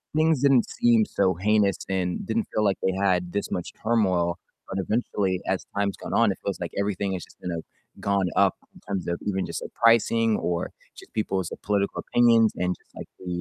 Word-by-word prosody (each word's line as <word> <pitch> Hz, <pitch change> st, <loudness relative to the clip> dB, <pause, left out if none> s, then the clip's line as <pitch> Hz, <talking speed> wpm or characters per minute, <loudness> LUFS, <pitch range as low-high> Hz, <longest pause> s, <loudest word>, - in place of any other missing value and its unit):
things 155 Hz, -3 st, +3 dB
didn't 135 Hz, -4 st, +4 dB
seem 115 Hz, -2 st, +3 dB
so 95 Hz, -2 st, +1 dB
heinous, 100 Hz, +1 st, +2 dB
and 95 Hz, -, -1 dB
didn't 225 Hz, +1 st, -1 dB
feel 110 Hz, -, +1 dB
like 100 Hz, -2 st, +2 dB
they 95 Hz, -, +1 dB
had 90 Hz, -2 st, +1 dB
this 100 Hz, -, -2 dB
much 90 Hz, -, -3 dB
turmoil, 95 Hz, -7 st, +2 dB, 0.3 s
but 95 Hz, -, -3 dB
eventually, 95 Hz, -3 st, 0 dB
as 95 Hz, -, -1 dB
time's 100 Hz, -1 st, 0 dB
gone -, -, -6 dB
on, 115 Hz, -3 st, +4 dB
it -, -, -5 dB
feels 100 Hz, -, -2 dB
like 85 Hz, -, -3 dB
everything 100 Hz, -1 st, -1 dB
has 90 Hz, -, -4 dB
just -, -, -21 dB
kinda 85 Hz, -3 st, -3 dB, 0.4 s
gone 100 Hz, -2 st, +1 dB
up -, -, +4 dB, 0.2 s
in -, -, -14 dB
terms 95 Hz, -3 st, -3 dB
of 85 Hz, 0 st, -2 dB
even 95 Hz, -2 st, 0 dB
just, -, -, -4 dB
like, -, -, -9 dB
pricing, 115 Hz, -1 st, +4 dB
or 85 Hz, -1 st, -2 dB, 0.2 s
just -, -, -14 dB
people's 95 Hz, -5 st, -1 dB
political 100 Hz, -1 st, 0 dB
opinions, 115 Hz, -2 st, +4 dB
and 90 Hz, 0 st, 0 dB
just -, -, -33 dB
like -, -, -8 dB
the 90 Hz, -, -10 dB
100 Hz, 200 wpm, -25 LUFS, 95-110 Hz, 0.4 s, didn't